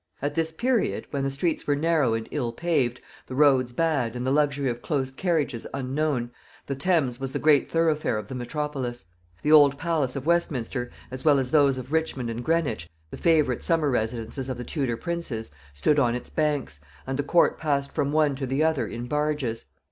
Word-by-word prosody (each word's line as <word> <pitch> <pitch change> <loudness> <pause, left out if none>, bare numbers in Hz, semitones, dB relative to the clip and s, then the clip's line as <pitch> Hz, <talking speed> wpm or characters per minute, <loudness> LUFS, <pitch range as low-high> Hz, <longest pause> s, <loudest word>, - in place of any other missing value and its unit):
At 145 +1 -2
this 165 -1 0
period, 235 +6 0
when 140 -2 -1
the 135 - 0
streets 145 +4 -1
were 145 - +3
narrow 150 -6 +2
and 115 0 -4
ill 125 -6 -1
paved, 130 -5 0 0.3
the 130 - -6
roads 135 -3 +4
bad, 135 -5 0
and 125 0 -3
the 130 - +1
luxury 145 -1 +2
of 120 -1 -2
close 135 -4 -1
carriages 150 -6 -1
unknown, 135 -2 -1 0.3
the 140 - -3
Thames 140 -4 +1
was 135 -1 -4
the - - 0
great 150 -2 +3
thoroughfare 160 -7 +1
of 105 -2 -5
the - - -7
metropolis. 130 -1 -4 0.4
The 150 - +2
old 145 -2 +7
palace 155 -5 -1
of 135 0 -4
Westminster, 135 -7 0 0.2
as 130 0 -6
well 150 -3 +5
as 130 -2 -1
those 140 -3 +4
of 130 +1 -7
Richmond 145 -7 -1
and 115 +1 -5
Greenwich, 145 - 0 0.2
the - - -6
favorite 155 -7 +2
summer 160 -4 +2
residences 115 +2 -2
of 130 - -3
the 125 - -5
Tudor 130 -4 -2
princes, 155 - -4 0.2
stood 145 - +2
on 120 -3 +2
its 125 - -7
banks, 145 - -1 0.3
and 135 - -3
the 145 - 0
court 170 +4 +3
passed 140 -3 0
from 140 0 -1
one 150 -2 +2
to 135 -1 -3
the 135 +4 +1
other 160 -3 +1
in 120 +1 -5
barges. 150 -4 -1
140 Hz, 200 wpm, -26 LUFS, 125-155 Hz, 0.4 s, old